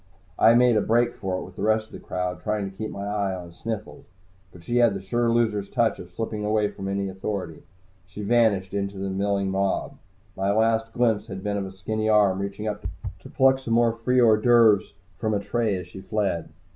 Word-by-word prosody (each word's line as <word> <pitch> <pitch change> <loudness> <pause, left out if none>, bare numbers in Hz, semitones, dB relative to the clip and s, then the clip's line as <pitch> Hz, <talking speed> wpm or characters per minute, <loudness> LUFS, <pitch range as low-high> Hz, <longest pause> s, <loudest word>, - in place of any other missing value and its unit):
I 115 +1 +6
made 120 -2 +5
a - - +3
break 120 +2 +2
for 95 -1 -3
it - - -5
with 90 - -13
the - - -7
rest 110 +1 +2
of - - -25
the - - -8
crowd, 90 0 -4
trying 105 -2 -1
to - - -20
keep 110 +2 -4
my 100 - -6
eye 100 -2 -1
on 85 -2 -9
Sniffles. 110 +3 -6 0.4
But 85 - -15
she 120 +7 -1
had 120 -4 +4
the - - -3
sure 115 +5 0
loser's 110 -4 +1
touch 115 -4 +1
of 90 - -9
slipping 105 +3 -4
away 105 0 +1
from 95 -1 -7
any 100 0 -1
authority. 95 -3 -5 0.5
She 105 +3 -8
vanished 100 -4 +2
into 100 0 -3
the 95 0 -3
milling 100 0 0
mob. 95 0 -1 0.4
My 95 +1 0
last 110 +1 +1
glimpse 115 -3 +1
had 95 -1 -7
been 105 0 -1
of 100 -1 -3
a - - -9
skinny 110 +3 -2
arm 100 -3 +4
reaching 100 +2 -4
up 105 -1 -4 0.3
to - - -13
pluck 130 0 +3
some 115 -4 -1
more 115 -1 +3
free 125 +2 +1
hors 110 -3 +6
d'oeuvres 115 -4 +4 0.2
from 110 -2 0
a - - +1
tray 110 0 -1
as 90 -1 -6
she 95 +2 -10
fled. 100 -6 -2
105 Hz, 220 wpm, -25 LUFS, 95-115 Hz, 0.5 s, I